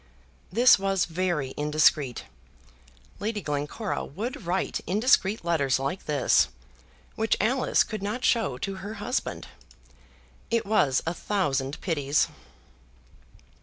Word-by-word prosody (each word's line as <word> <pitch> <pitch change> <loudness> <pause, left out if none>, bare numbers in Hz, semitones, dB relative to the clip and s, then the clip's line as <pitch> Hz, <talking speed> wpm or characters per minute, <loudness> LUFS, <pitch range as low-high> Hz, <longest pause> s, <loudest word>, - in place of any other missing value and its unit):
This 240 +3 +6
was 195 -1 +1
very 170 -6 -2
indiscreet. 150 -3 +2 1.0
Lady 210 +2 -2
Glencora 150 +6 -3
would 210 - -6
write 185 +2 -1
indiscreet 210 - +2
letters 145 -6 +2
like 135 +8 -3
this, 145 -4 +3 0.7
which 220 0 0
Alice 250 +5 +2
could 215 -3 -6
not 215 +6 -3
show 220 - +2
to 195 +7 -4
her 200 +3 -7
husband. 235 +5 -3 1.0
It 230 0 +1
was 150 -11 +2
a 165 - -1
thousand 145 -9 -1
pities. 145 -5 +1
185 Hz, 110 wpm, -26 LUFS, 150-215 Hz, 1.0 s, This